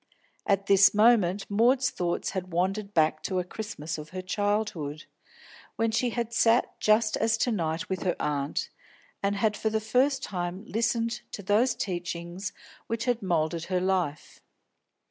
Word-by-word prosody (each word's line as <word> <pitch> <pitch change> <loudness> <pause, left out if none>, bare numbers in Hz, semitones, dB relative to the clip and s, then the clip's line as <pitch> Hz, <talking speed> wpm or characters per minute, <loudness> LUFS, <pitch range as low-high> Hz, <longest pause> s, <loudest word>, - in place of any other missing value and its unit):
At 200 -1 +2
this 195 +1 +6
moment 210 -4 +4
Maud's 245 +5 +3
thoughts 175 -1 -2
had 185 -1 -4
wandered 195 +4 -1
back 155 -3 +2
to 190 - -2
a 180 - +1
Christmas 175 -5 -6
of 150 0 -9
her 185 +2 -6
childhood, 205 -6 -2 0.7
when 225 0 +1
she 225 +3 +1
had 235 0 -3
sat 230 +1 +2
just 215 0 +3
as 225 +1 +2
to 245 - +1
night 165 -5 -2
with 190 -2 -3
her 180 - 0
aunt, 145 0 -2 0.5
and 200 0 0
had 210 +1 +1
for 220 - -1
the 220 0 0
first 255 +5 +1
time 180 +1 -4
listened 230 +1 -1
to 200 - -6
those 215 +6 +2
teachings 175 0 -4 0.4
which 230 0 -2
had 245 -2 0
moulded 165 -3 0
her 185 -1 0
life. 180 -6 -2
200 Hz, 160 wpm, -27 LUFS, 175-225 Hz, 0.7 s, this